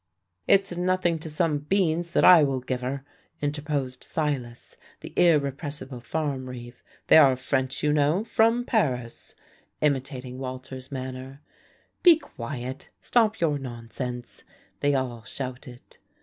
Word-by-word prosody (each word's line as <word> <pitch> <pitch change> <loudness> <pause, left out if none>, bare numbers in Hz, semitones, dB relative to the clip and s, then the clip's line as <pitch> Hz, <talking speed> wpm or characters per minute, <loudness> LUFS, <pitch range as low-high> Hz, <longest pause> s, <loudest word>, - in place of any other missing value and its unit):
"It's 195 -2 +4
nothing 180 -2 +1
to 160 - -6
some 150 -1 +1
beans 170 +1 0
that - - +4
I 180 -3 +9
shall 135 -3 +1
give 125 0 -3
her," 135 +2 -4 0.3
interposed 145 -3 -3
Silas, 135 -6 -3 0.3
the - - -9
irrepressible 145 -4 +1
farm 135 -1 -3
reeve. 120 -1 -9 0.2
"They - - +7
are 140 -4 +7
French, 130 +1 -2
you 150 0 +3
know, 150 +6 +2
from 230 +1 +2
Paris," 125 - -1 0.4
imitating 130 -3 -1
Walter's 130 0 -7
manner. 130 +1 -7 0.6
"Be 345 -3 +8
quiet"; 130 - -7
"stop 220 -2 +2
your 150 -5 +1
nonsense," 120 0 -6 0.4
they 145 0 +2
all 125 -3 -2
shouted. 125 -1 -8
140 Hz, 125 wpm, -26 LUFS, 130-160 Hz, 0.6 s, I